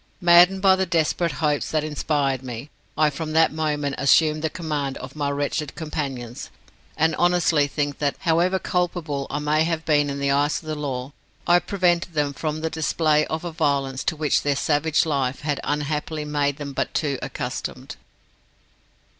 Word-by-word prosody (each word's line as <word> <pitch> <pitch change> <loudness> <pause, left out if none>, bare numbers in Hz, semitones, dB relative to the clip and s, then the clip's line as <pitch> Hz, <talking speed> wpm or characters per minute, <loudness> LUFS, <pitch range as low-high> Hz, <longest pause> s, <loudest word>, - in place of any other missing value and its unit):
Maddened 175 +2 +6
by 190 -1 +6
the 190 0 -1
desperate 170 0 +1
hopes 150 -1 +1
that 155 -1 0
inspired 145 -3 -1
me, 130 +2 -7 0.3
I 155 -1 +3
from 155 +2 -5
that 160 0 +4
moment 150 -3 -1
assumed 155 +2 +4
the 160 - 0
command 150 -5 -3
of 130 +2 -9
my 145 -2 -1
wretched 145 +1 -2
companions; 135 -7 -5 0.5
and 160 0 +2
honestly 175 -4 +3
think 145 -1 -3
that, 145 -2 0
however 175 +2 +2
culpable 170 -7 -2
I 145 - -2
may 150 +1 +1
have 165 -1 -2
been 145 -2 +3
in 140 - -3
the 140 0 0
eyes 145 +2 +2
of - - -17
the 155 - -3
law, 140 -2 -4 0.3
I 175 +1 +5
prevented 175 -3 0
them 145 -1 0
from 155 +3 -3
the 160 - -1
display 155 -1 +1
of 160 +2 -4
a 175 - -3
violence 140 -5 0
to 160 - 0
which 150 -1 +1
their 145 -1 0
savage 150 +3 +1
life 135 -4 -1
had 145 -1 -1
unhappily 150 +1 -2
made 145 -1 0
them 145 -2 -6
but - - -2
too 140 -4 0
accustomed." - - -5
150 Hz, 175 wpm, -23 LUFS, 140-160 Hz, 0.5 s, Maddened